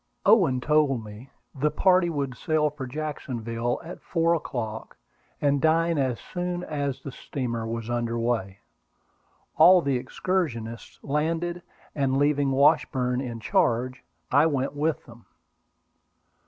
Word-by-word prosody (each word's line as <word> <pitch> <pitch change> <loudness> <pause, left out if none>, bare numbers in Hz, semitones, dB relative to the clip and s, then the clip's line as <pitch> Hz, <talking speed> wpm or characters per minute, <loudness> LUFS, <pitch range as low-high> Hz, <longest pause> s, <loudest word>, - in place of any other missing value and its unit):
Owen 185 - +5
told 150 -5 +2
me 105 +5 -11 0.2
the 145 +3 +1
party 180 +3 +3
would 140 -5 -3
sail 155 0 +1
for 140 -3 -7
Jacksonville 120 -5 -3
at 170 - -9
four 165 -1 +1
o'clock, 115 -9 -4 0.4
and 140 -1 +2
dine 165 +1 +2
as 130 -3 0
soon 180 0 -4
as 145 -5 -3
the 140 - -6
steamer 120 -3 -4
was 115 0 -4
under 120 -1 -1
way. 115 -5 -1 1.0
All 180 +4 +8
the 140 -6 0
excursionists 125 - -3
landed, 165 +4 -1 0.3
and 135 -2 0
leaving 145 0 +2
Washburn 130 -2 +2
in 120 -3 -5
charge, 125 +4 0 0.3
I 145 +4 +5
went 140 -3 -1
with 150 +2 -1
them. 120 -1 -16
140 Hz, 130 wpm, -26 LUFS, 120-155 Hz, 1.0 s, All